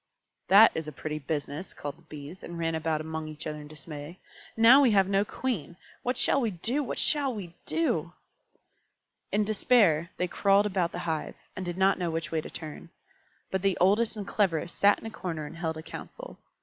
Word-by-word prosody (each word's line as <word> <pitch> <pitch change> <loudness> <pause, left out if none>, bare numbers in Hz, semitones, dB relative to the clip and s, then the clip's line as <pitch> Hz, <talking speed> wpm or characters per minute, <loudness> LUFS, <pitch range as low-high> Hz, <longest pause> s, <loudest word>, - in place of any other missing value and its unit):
"That 205 +4 +8
is 160 -1 -4
a - - -4
pretty 150 +2 -5
business!" 150 +4 -4
called 145 0 -5
the 170 - -23
Bees, 155 +2 -10
and 170 - -7
ran 165 -1 -1
about 160 -1 -1
among 160 0 -5
each 155 0 -8
other 150 0 -4
in 150 - -10
dismay. 150 +1 -9 0.4
"Now 235 +5 +8
we 265 - +5
have 195 -2 +4
no 195 0 +2
Queen! 205 - -4 0.2
What 250 +1 -1
shall 275 - +3
we 230 - +1
do? 225 - -1
What 270 - -4
shall 285 -3 +2
we 180 -5 -7
do?" 330 0 0 1.2
In 210 +1 +2
despair 200 -6 +3
they 180 - 0
crawled 200 +3 +3
about 185 -4 0
the 175 - -5
hive, 160 -2 -2 0.2
and 185 - -4
did 175 -1 -4
not 190 +1 +3
know 175 -2 -1
which 165 0 -3
way 160 -1 0
to - - -9
turn. 160 +1 -8 0.6
But 190 - 0
the 195 -1 +1
oldest 210 +5 +3
and 205 - -4
cleverest 175 -5 0
sat 200 0 +5
in - - -12
a 225 - -5
corner 170 -7 -4
and 150 - -9
held 160 -2 -2
a 160 - -7
council. - - -9
175 Hz, 205 wpm, -28 LUFS, 160-205 Hz, 1.2 s, That